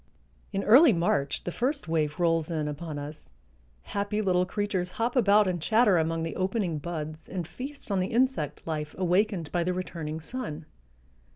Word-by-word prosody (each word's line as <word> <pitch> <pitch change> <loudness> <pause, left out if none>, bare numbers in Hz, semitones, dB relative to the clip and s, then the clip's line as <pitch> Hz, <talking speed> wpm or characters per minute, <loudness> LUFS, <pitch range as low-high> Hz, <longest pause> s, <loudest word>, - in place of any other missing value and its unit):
In 195 -1 -1
early 255 +4 +7
March 145 -5 0
the 175 - -3
first 270 - -1
wave 155 -1 0
rolls 165 -2 +2
in 155 -3 -1
upon 150 +1 -5
us; 145 - -8 0.5
happy 205 - -2
little 180 -3 +2
creatures 190 -4 -2
hop 235 +3 0
about 210 -4 +5
and 175 -3 -1
chatter 215 -1 +4
among 165 0 0
the 165 -2 -4
opening 185 -4 -1
buds 155 -1 -6
and 180 -4 -4
feast 270 +4 -8
on 195 - +2
the 185 - 0
insect 235 - 0
life 150 -2 -4
awakened 180 -3 +1
by 175 -1 +1
the 180 +1 0
returning 160 -4 -4
sun. 160 -4 -5
180 Hz, 170 wpm, -28 LUFS, 160-205 Hz, 0.5 s, early